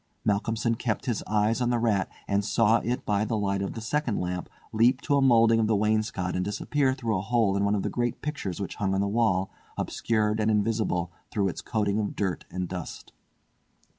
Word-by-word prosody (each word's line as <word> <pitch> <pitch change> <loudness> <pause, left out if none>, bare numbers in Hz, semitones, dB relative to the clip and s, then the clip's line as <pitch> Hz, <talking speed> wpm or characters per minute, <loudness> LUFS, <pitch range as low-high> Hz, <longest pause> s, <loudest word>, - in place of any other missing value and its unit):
Malcolmson 110 +2 +1
kept 115 -2 -2
his 120 -4 -1
eyes 110 +3 +1
on 120 - +2
the 120 - +2
rat, 110 -5 +1 0.2
and 100 0 +1
saw 115 +1 +3
it 120 +2 -2
by 105 0 +1
the 110 0 -1
light 100 -1 0
of 100 - -3
the 115 - -6
second 130 0 -1
lamp 90 0 -3 0.2
leap 120 +4 +4
to 145 +1 0
a 140 - +3
moulding 115 -3 +5
of 110 - +2
the 110 - +2
wainscot 105 -3 0
and 90 - 0
disappear 130 +7 0
through 115 -4 -1
a 95 - 0
hole 110 -1 +1
in 100 - +1
one 100 +1 +2
of 100 - -1
the - - -1
great 120 0 -1
pictures 135 - -4
which 100 - -5
hung 95 -2 0
on 95 - +1
the 100 - +1
wall, 100 -3 +1 0.3
obscured 110 -1 0
and 110 0 +2
invisible 105 -5 0 0.2
through 100 -2 0
its - - -6
coating 105 -2 0
of 105 - -2
dirt 95 -3 -2
and 90 0 -3
dust. 90 -2 -7
110 Hz, 215 wpm, -27 LUFS, 100-115 Hz, 0.3 s, moulding